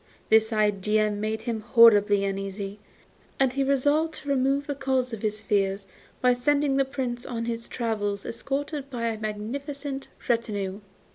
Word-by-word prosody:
This 220 Hz, +1 st, +5 dB
idea 210 Hz, 0 st, +2 dB
made 215 Hz, +2 st, -3 dB
him 230 Hz, -2 st, -2 dB
horribly 205 Hz, -3 st, +6 dB
uneasy, 195 Hz, +1 st, -4 dB, 0.6 s
and 265 Hz, -2 st, +3 dB
he 275 Hz, +1 st, +1 dB
resolved 290 Hz, +4 st, +2 dB
to 290 Hz, -, -5 dB
remove 275 Hz, +1 st, +2 dB
the 285 Hz, -, -2 dB
cause 265 Hz, -3 st, -1 dB
of 220 Hz, -, -5 dB
his 215 Hz, 0 st, -2 dB
fears 195 Hz, -1 st, 0 dB, 0.4 s
by 250 Hz, 0 st, +5 dB
sending 285 Hz, +3 st, +1 dB
the 275 Hz, 0 st, +3 dB
Prince 255 Hz, -3 st, -3 dB
on 230 Hz, -2 st, -4 dB
his 230 Hz, 0 st, -4 dB
travels 205 Hz, -4 st, -2 dB
escorted 275 Hz, +4 st, -4 dB
by 235 Hz, -3 st, -2 dB
a 220 Hz, -1 st, -4 dB
magnificent 270 Hz, +6 st, -4 dB, 0.2 s
retinue. 205 Hz, -5 st, -1 dB
230 Hz, 150 wpm, -26 LUFS, 210-270 Hz, 0.6 s, horribly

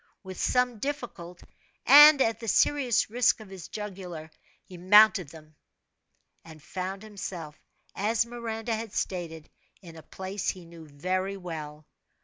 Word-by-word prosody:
With 190 Hz, -2 st, -9 dB
some 250 Hz, -3 st, +1 dB
difficult, 220 Hz, -11 st, -6 dB, 0.4 s
and 295 Hz, +1 st, +9 dB
at 225 Hz, -1 st, -1 dB
the 230 Hz, -, -8 dB
serious 255 Hz, -2 st, +2 dB
risk 245 Hz, 0 st, +2 dB
of 215 Hz, -3 st, -12 dB
his 190 Hz, -3 st, -10 dB
jugular, 180 Hz, -6 st, -8 dB, 0.3 s
he 185 Hz, -, -14 dB
mounted 200 Hz, -1 st, +5 dB
them, 155 Hz, 0 st, -15 dB, 0.9 s
and 160 Hz, -1 st, -13 dB
found 190 Hz, +5 st, -6 dB
himself, 190 Hz, -7 st, -8 dB, 0.4 s
as 220 Hz, +3 st, 0 dB
Miranda 230 Hz, -1 st, -5 dB
had 220 Hz, -1 st, -7 dB
stated, 165 Hz, -4 st, -4 dB, 0.3 s
in 170 Hz, -4 st, -13 dB
a 160 Hz, -, -11 dB
place 190 Hz, +5 st, -5 dB
he 180 Hz, -2 st, -6 dB
knew 165 Hz, -1 st, -13 dB
very 185 Hz, +7 st, -3 dB
well. 155 Hz, -4 st, -8 dB
190 Hz, 135 wpm, -27 LUFS, 170-225 Hz, 0.9 s, and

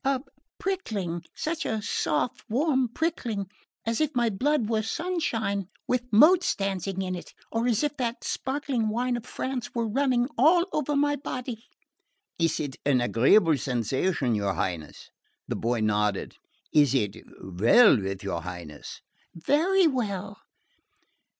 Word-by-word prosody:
"A 270 Hz, -1 st, +1 dB, 0.4 s
prickling...such 220 Hz, -, -3 dB
a 220 Hz, -, -1 dB
soft 200 Hz, 0 st, -1 dB
warm 265 Hz, +1 st, +2 dB
prickling...as 230 Hz, -, -3 dB
if 300 Hz, -2 st, 0 dB
my 240 Hz, -2 st, +2 dB
blood 265 Hz, +3 st, +1 dB
were 220 Hz, -1 st, +1 dB
sunshine 225 Hz, -, -2 dB, 0.2 s
with 250 Hz, 0 st, -1 dB
motes 335 Hz, -, +6 dB
dancing 195 Hz, -1 st, -2 dB
in 185 Hz, -1 st, -3 dB
it...or 225 Hz, +6 st, -4 dB
as 235 Hz, +2 st, +2 dB
if 295 Hz, 0 st, -1 dB
that 240 Hz, -2 st, -2 dB
sparkling 265 Hz, -5 st, -1 dB
wine 245 Hz, +3 st, 0 dB
of 240 Hz, 0 st, -6 dB
France 260 Hz, -3 st, -4 dB
were 230 Hz, -1 st, 0 dB
running 250 Hz, +1 st, +1 dB
all 340 Hz, +6 st, +5 dB
over 295 Hz, -1 st, 0 dB
my 290 Hz, +1 st, +2 dB
body." 250 Hz, -4 st, -6 dB, 0.7 s
"It 165 Hz, -2 st, +1 dB
is 145 Hz, -3 st, -4 dB
an 140 Hz, -3 st, +3 dB
agreeable 145 Hz, -, +4 dB
sensation, 125 Hz, -, 0 dB
your 100 Hz, -3 st, 0 dB
Highness?" 85 Hz, -6 st, -4 dB, 0.4 s
The -, -, -2 dB
boy 120 Hz, 0 st, -1 dB
nodded. 105 Hz, -1 st, 0 dB, 0.4 s
"It 145 Hz, -3 st, +4 dB
is 105 Hz, -6 st, -1 dB, 0.2 s
well 110 Hz, -, +5 dB
with 95 Hz, 0 st, -4 dB
your 90 Hz, -4 st, -3 dB
Highness?" 85 Hz, -4 st, -8 dB, 0.4 s
"Very 345 Hz, -, +3 dB
well." 205 Hz, -, -2 dB
220 Hz, 130 wpm, -27 LUFS, -, 0.7 s, motes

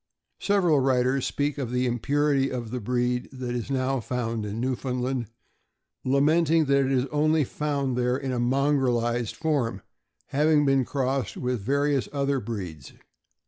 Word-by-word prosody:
Several 180 Hz, -7 st, +3 dB
writers 130 Hz, 0 st, +2 dB
speak 145 Hz, 0 st, -1 dB
of 130 Hz, -4 st, -3 dB
the 125 Hz, +1 st, 0 dB
impurity 135 Hz, +3 st, +1 dB
of 120 Hz, -3 st, -4 dB
the 125 Hz, -, -2 dB
breed 125 Hz, +2 st, -1 dB
that 130 Hz, -2 st, -5 dB
is 120 Hz, +1 st, -4 dB
now 135 Hz, 0 st, 0 dB
found 115 Hz, -2 st, -3 dB
in 105 Hz, +2 st, -4 dB
Newfoundland, 125 Hz, -1 st, -2 dB, 0.8 s
lamenting 155 Hz, +4 st, +3 dB
that 140 Hz, -1 st, +3 dB
it 130 Hz, -, -1 dB
is 130 Hz, -1 st, +2 dB
only 155 Hz, +1 st, +2 dB
found 140 Hz, -2 st, -2 dB
there 125 Hz, +1 st, +1 dB
in 135 Hz, -1 st, -3 dB
a 125 Hz, -, -1 dB
mongrelized 120 Hz, -3 st, +1 dB
form, 135 Hz, -, -1 dB, 0.5 s
having 150 Hz, +1 st, +3 dB
been 135 Hz, -2 st, +3 dB
crossed 135 Hz, 0 st, -2 dB
with 125 Hz, -3 st, -2 dB
various 140 Hz, +4 st, 0 dB
other 140 Hz, -1 st, 0 dB
breeds. 90 Hz, -, -6 dB
130 Hz, 145 wpm, -26 LUFS, 125-140 Hz, 0.8 s, Several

